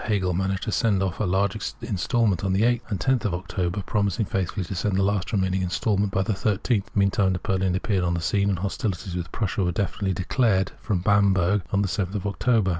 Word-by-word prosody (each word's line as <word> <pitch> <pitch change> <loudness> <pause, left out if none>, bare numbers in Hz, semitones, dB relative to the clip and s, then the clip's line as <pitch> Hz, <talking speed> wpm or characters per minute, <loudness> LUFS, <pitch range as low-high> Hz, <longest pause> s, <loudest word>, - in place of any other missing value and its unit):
■ - - -8
Hegel 95 -5 0
managed 95 +2 -1
to 110 - -2
send 100 -3 +2
off 95 -2 -3
large 95 0 +1 0.3
instalments 100 -2 0
on 95 -1 +1
the 100 +3 +2
8th' 120 0 +3
and 100 -3 -3
on 130 -1 +4
10th 110 - -8
of 95 -5 0
October, 95 +1 -3
promising 105 +1 0
faithfully 95 0 -2
to 90 - -5
send 95 +2 -1
the 95 - +2
last 100 -1 0
remaining 95 -2 +1
instalment 100 +2 0
by 95 - +1
the 110 - 0
13th. 105 +1 0
Meantime, 100 -1 +2
Napoleon 95 +1 0
appeared 95 -1 0
on 85 -1 +1
the - - -1
scene, 100 +4 +1
and 95 - 0
hostilities 95 -1 -3
with 85 -1 -4
Prussia 100 -2 -1
were 90 - +1
definitely 95 +1 -1
declared 95 +1 +1
from 95 -5 -1
Bamberg 100 0 +3
on 100 +1 +2
the - - 0
7th 95 +1 -2
October. 105 0 +1
95 Hz, 215 wpm, -25 LUFS, 95-105 Hz, 0.3 s, on